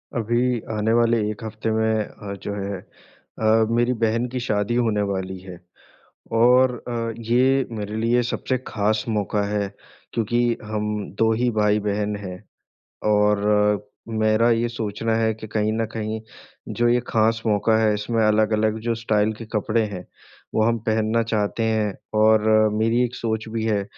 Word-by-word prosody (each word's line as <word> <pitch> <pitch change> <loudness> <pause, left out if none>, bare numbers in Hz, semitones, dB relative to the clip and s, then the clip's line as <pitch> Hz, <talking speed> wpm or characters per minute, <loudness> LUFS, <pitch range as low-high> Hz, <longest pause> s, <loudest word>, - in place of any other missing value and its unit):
अभी 120 +1 +1
आने 110 +1 0
वाले 115 0 +3
एक 105 +1 -6
हफ़्ते 110 0 -3
में 110 0 +1
अ, 100 -1 -9
जो 100 - -3
है 100 -1 -4 0.6
अ, 110 0 +4
मेरी 120 +2 +2
बहन 115 +2 +1
की 125 - -1
शादी 105 -1 -1
होने 110 -4 +1
वाली 95 -1 -3
है। 90 -2 -11 0.8
और 125 +2 +5
अ, 115 -1 -2 0.2
ये 130 +2 +3
मेरे 105 0 -5
लिए 115 +2 +2
सबसे 130 +2 -2
ख़ास 105 0 0
मौका 105 -1 0
है 105 -1 -1 0.4
क्योंकि 120 +1 0 0.2
हम 105 0 -3 0.3
2 110 0 +3
ही 120 +2 +1
भाई-बहन 105 0 +1
हैं। 95 -3 -8 0.7
और 105 0 +3 0.3
मेरा 110 +1 +2
ये 115 +1 +1
सोचना 110 -1 -2
है 110 -1 +1
कि 110 0 -9
कहीं 105 0 0
न 115 0 0
कहीं 110 0 -3 0.6
जो 120 - +4
ये 120 +1 +3
ख़ास 115 +1 +2
मौका 110 +1 +3
है 110 -1 +3
इसमें 110 +2 -1
अलग-अलग 110 0 +2
जो 115 0 -1
स्टाइल 110 -1 +1
के 115 - -7
कपड़े 110 +1 +1
हैं 90 -1 -7 0.5
वो 110 - +3
हम 115 +1 +2
पहनना 110 +1 +1
चाहते 105 +1 0
हैं। 110 -2 0 0.3
और 110 0 +4 0.3
मेरी 115 +3 +2
एक 125 +1 -6
सोच 110 -1 -3
भी 110 0 -3
है 105 -3 +1
110 Hz, 160 wpm, -23 LUFS, 105-115 Hz, 0.8 s, और